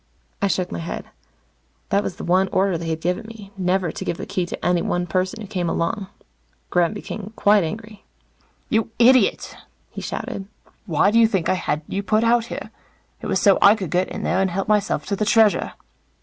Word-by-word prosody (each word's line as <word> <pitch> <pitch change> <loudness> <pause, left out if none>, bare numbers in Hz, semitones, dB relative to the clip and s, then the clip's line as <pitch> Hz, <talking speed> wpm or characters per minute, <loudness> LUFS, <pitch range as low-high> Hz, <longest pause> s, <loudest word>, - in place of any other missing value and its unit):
I 200 - +3
shook 185 -2 -1
my - - -4
head. 165 - -5 0.8
That 200 0 +2
was 195 - -4
the - - -8
one 185 +2 +3
order 190 -1 +1
they 165 0 -4
had 160 0 -2
given 180 +6 -2
me 215 -3 -11
never 185 -2 0
to - - -6
give 170 - -2
the - - -6
Key 180 -2 -2
to - - -6
any 175 -1 +2
one 175 0 -1
person 185 +4 -1
who - - -6
came 180 -4 -2
alone. 190 +5 -1 0.6
Gremm 175 +3 +2
became 210 0 -7
quite 205 -1 +4
angry. 215 +4 -7 0.6
"You 225 -1 +1
idiot," 245 -2 +4 0.4
he - - -7
shouted. 195 -1 -5 0.4
"Why 175 +4 +3
do 230 - +4
you 230 - +6
think 195 -6 -1
I - - +4
had 155 -4 -2
you 200 - -2
put 215 +2 +1
out 230 0 +3
here? - - -7 0.5
It - - -5
was - - +1
so 200 -3 +4
I 200 +2 +7
could 190 -7 -5
get 180 +1 +1
in - - -6
there 180 - +1
and 190 - +1
help 190 +2 -3
myself 205 -8 +1
to 200 - -1
the 215 - -1
Treasure." 220 -1 +3
195 Hz, 210 wpm, -22 LUFS, 180-215 Hz, 0.8 s, I